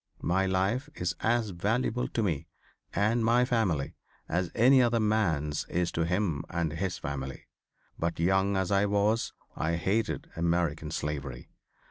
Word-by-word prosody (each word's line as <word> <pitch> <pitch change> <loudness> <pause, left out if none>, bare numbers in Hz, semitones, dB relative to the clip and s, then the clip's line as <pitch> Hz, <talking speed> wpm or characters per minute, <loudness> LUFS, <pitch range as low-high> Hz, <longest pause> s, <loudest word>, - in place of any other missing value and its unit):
My 95 +2 +2
life 95 +10 0
is 90 0 -1
as 115 -2 +1
valuable 115 +7 0
to 115 - -1
me 80 -9 -1 0.4
and 110 +3 +1
my 120 +2 +4
family 100 - 0 0.3
as 90 +1 0
any 130 +3 +6
other 120 -1 +3
man's 85 -9 +1
is 90 0 -1
to 80 - 0
him 90 -3 0
and 85 -3 -1
his 90 +1 -2
family. 65 -4 -5 0.5
But 85 0 -1
young 95 +3 +2
as 95 -1 0
I 100 +1 +3
was 105 +3 +1 0.2
I 80 +2 0
hated 95 - -1
American 85 -2 0
slavery. 70 -5 -4
95 Hz, 145 wpm, -29 LUFS, 80-110 Hz, 0.5 s, any